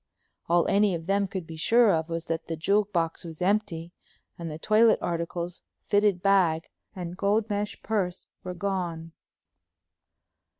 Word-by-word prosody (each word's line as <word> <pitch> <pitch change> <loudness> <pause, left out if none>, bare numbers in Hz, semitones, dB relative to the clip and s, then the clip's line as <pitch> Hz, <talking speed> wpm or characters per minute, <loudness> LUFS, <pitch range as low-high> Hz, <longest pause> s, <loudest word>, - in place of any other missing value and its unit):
All 170 0 +3
any 200 -2 +3
of 165 -1 -6
them 200 +2 +1
could 185 -2 -5
be 160 -1 -9
sure 225 +6 +4
of 160 0 -1
was 165 0 -3
that 165 0 -3
the 165 - -2
jewel 200 +6 +2
box 170 -5 -2
was 165 -2 -9
empty, 180 -3 0 0.4
and 170 -1 -6
the 155 - -6
toilet 220 +6 +4
articles, 170 +1 -3 0.3
fitted 205 -3 +3
bag, 180 -5 +3 0.3
and 175 -2 -5
gold 205 +3 +1
mesh 205 0 -2
purse 190 -5 -1 0.2
were 180 -1 -5
gone. 175 -4 -3
180 Hz, 155 wpm, -27 LUFS, 165-200 Hz, 0.4 s, sure